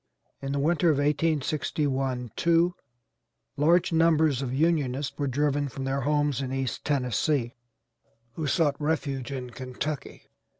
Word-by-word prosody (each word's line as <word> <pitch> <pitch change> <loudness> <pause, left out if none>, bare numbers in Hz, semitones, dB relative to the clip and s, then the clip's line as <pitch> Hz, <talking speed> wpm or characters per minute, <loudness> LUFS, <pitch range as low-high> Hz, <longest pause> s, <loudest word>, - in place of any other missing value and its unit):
In 135 - -3
the 140 - -1
winter 165 +3 +2
of 150 - +3
1861 145 -4 0
2 170 +1 +3 0.8
large 165 +4 +3
numbers 160 -4 +3
of 130 -3 -3
Unionists 145 -2 0
were 140 - -2
driven 145 +2 0
from 135 +1 -6
their 135 +1 -1
homes 145 -1 +1
in 130 -1 -3
East 135 -2 -3
Tennessee, 130 -1 0 0.8
who 155 +2 -3
sought 145 -1 +1
refuge 140 -4 -1
in 125 -2 -5
Kentucky. 130 +4 -5
145 Hz, 130 wpm, -27 LUFS, 130-155 Hz, 0.8 s, of